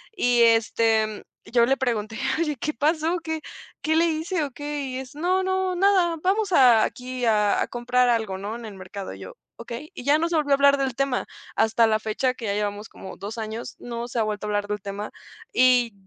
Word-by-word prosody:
Y, 245 -9 +3
este, 225 -1 +3
mm, 215 -1 -8 0.3
yo 235 -1 +5
le 270 +1 +2
pregunté: 225 -4 -2 0.2
"Oye, 300 -4 -1
¿qué 305 +5 -2
pasó? 315 +3 +1
¿Qué 320 -1 -3 0.4
qué 315 0 +1
le 330 +1 +4
hice 325 +1 -1
o 285 - -4
qué?". 290 +2 -5
Y 260 -1 -4
es: 260 -1 -9
"No, 365 +5 +1
no, 375 -1 0
nada. 360 -3 +3
Vamos 395 +2 +1
a 245 -7 +6
aquí, 250 0 -3
a 210 -2 +3
a - - 0
comprar 245 +1 +1
algo, 220 -5 0
¿no?, 205 +3 -5
en 235 0 -8
el 210 -2 -8
mercado". 190 +1 -7
Y - - -11
yo: - - -9 0.2
"Okey". 240 +7 -8
Y 250 - -7
ya 290 +2 +5
no 335 +1 0
se 340 - -1
volvió 295 -2 0
a - - +7
hablar 280 0 +6
del 265 -3 -1
tema. 275 -1 0 0.3
Hasta 225 +1 +3
la 215 0 +2
fecha, 220 +4 -1
que 250 -3 -8
ya 200 - 0
llevamos 205 +1 -3
como 190 - -10
2 210 +3 -7
años, 220 +3 -5
no 235 0 -5
se 240 -1 -3
ha - - +3
vuelto 210 -1 -3
a - - -3
hablar 205 0 -1
del 210 -1 -3
tema 200 +1 -6 0.4
y 250 -3 +4
245 Hz, 230 wpm, -24 LUFS, 220-300 Hz, 0.4 s, a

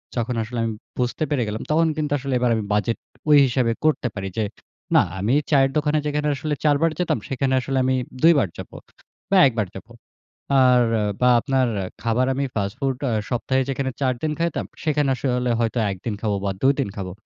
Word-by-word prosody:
যখন 120 +1 -1
আসলে 120 +1 -5
আমি 115 - -1 0.3
বুঝতে 125 +5 -1
পেরে 135 -5 +1
গেলাম 105 +1 -4
তখন 165 +1 +3
কিন্তু 150 -1 -2
আসলে 135 0 -3
এবার 120 -1 +2
আমি 110 - -2
বাজেট 110 +2 0 0.3
ঐ - - 0 0.2
হিসাবে 120 -2 +1
করতে 140 -5 +2
পারি 95 -1 -4
যে 110 - +1 0.5
না - - +8 0.2
আমি 110 +7 +1 0.2
চায়ের 135 -1 +4
দোকানে 150 0 +1
যেখানে 150 0 -1
আসলে 150 +3 -3
৪ 145 -2 +4
বার 165 -1 +3
যেতাম 180 - +1
সেখানে 135 0 0
আসলে 135 +1 -2
আমি 130 0 +2 0.3
২ 170 +1 +8
বার 95 - 0
যাবো - - -9 0.6
বা 195 - +5
১ 125 - -2
বার 100 - -2
যাবো। 110 +4 -13 0.7
আর 125 -1 +5 0.2
আ - - 0 0.2
বা 125 - +5
আপনার 130 0 +1 0.3
খাবার 120 +3 +1
আমি 140 +1 -1
ফাস্ট 100 -1 -2
ফুড 135 -2 0
আ - - -1 0.2
সপ্তাহে 130 +2 0
যেখানে 135 0 -2
৪ 130 -1 +2
দিন 155 -1 -1
খাইতাম, 170 0 -1 0.2
সেখানে 150 -3 +1
আসলে 125 -1 -1
হয়তো 115 +1 0
১ 95 - -5
দিন 115 - -1
খাবো 105 -3 0
বা - - +1
২ 135 +1 +4
দিন 120 -7 0
খাবো। 95 -2 -5
130 Hz, 210 wpm, -22 LUFS, 115-140 Hz, 0.7 s, না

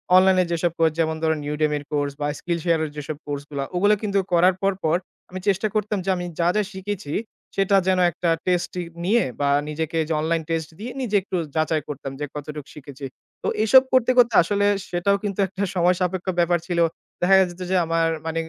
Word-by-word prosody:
Online 185 0 +6
যেসব 170 0 +1
course 160 -1 +3
যেমন 160 -1 +1
ধরুন 160 -1 +1
Udemy 150 0 +1
এর 145 - -7
কোর্স 145 -1 0
বা 145 - +1
Skillshare 170 -1 0
এর - - -5
যেসব 150 0 -5
কোর্স 145 -1 -4
গুলা 140 -2 -3
ওগুলা 205 +4 +4
কিন্তু 200 -1 +1
করার 180 +2 +5
পর, 195 0 +2
পর 160 +1 +3 0.3
আমি 185 +1 -6
চেষ্টা 200 +2 +2
করতাম 210 0 0
যে - - -1
আমি 175 - -4
যা, 170 - +3
যা 210 - +3
শিখেছি 190 -5 -5 0.4
সেটা 195 0 +2
যেন 185 -1 +3
একটা 170 0 -2 0.2
টেস্ট 180 -1 +1 0.3
নিয়ে 230 +4 +3 0.2
বা 140 0 +1 0.2
নিজেকে 160 +1 -3
যে 160 - -1
অনলাইন 165 +1 0
টেস্ট 165 -1 -2
দিয়ে 240 +4 -5
নিজে 215 -5 -1
একটু 190 0 -6 0.2
যাচাই 155 0 +1
করতাম 135 -2 -5
যে 150 - -2
কতটুকু 150 0 -7
শিখেছি। 140 -1 -9 0.4
তো - - -1 0.2
এসব 260 +4 +7
করতে, 255 -1 +4
করতে 240 -1 +5
আসলে 205 +3 0 0.2
সেটাও 190 +3 +1
কিন্তু 200 -1 -3
একটা 195 +1 -4
সময় 180 0 +3
সাপেক্ষ 185 +1 -2
ব্যাপার 175 0 +3
ছিল। 175 -2 -1 0.4
দেখা 185 +2 +5
যেত 175 +1 -11
যে - - +2
আমার 165 0 +1 0.2
মানে 165 0 -2
175 Hz, 200 wpm, -23 LUFS, 155-195 Hz, 0.4 s, এসব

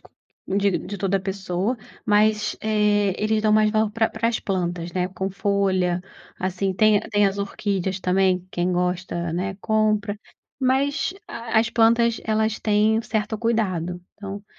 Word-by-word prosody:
co - - -19 0.5
de 200 -2 +2
de 205 - -7
toda 195 +1 +1
pessoa, 195 +3 -2 0.3
mas, 210 0 +2
eh, 210 -2 +2
eles 215 0 +2
dão 215 0 +2
mais 215 0 +4
valor 215 -1 +1
para 225 +1 +1
as - - -8
para 225 +1 0
as 235 - -1
plantas, 175 -3 -2
né, 180 -1 0
com 190 +1 -4
folha, 190 -3 0 0.4
assim, 185 +1 -1
tem 215 +1 +4
a - - -8
tem 205 -1 +3
as 195 +1 -2
orquídeas 195 -2 -2
também, 185 -1 +1
quem 175 0 -1
gosta, 180 -1 -1
né, 185 +3 -2
compra, 215 -1 +1 0.4
mas, 275 +7 +1
a 230 -1 -1
as 230 +1 +1
plantas, 230 0 +3
elas 220 0 0
têm 215 +1 +3
um - - -2
certo 215 -1 -2
cuidado, 190 -7 -1 0.2
então, 200 0 -7
205 Hz, 165 wpm, -23 LUFS, 185-220 Hz, 0.5 s, mais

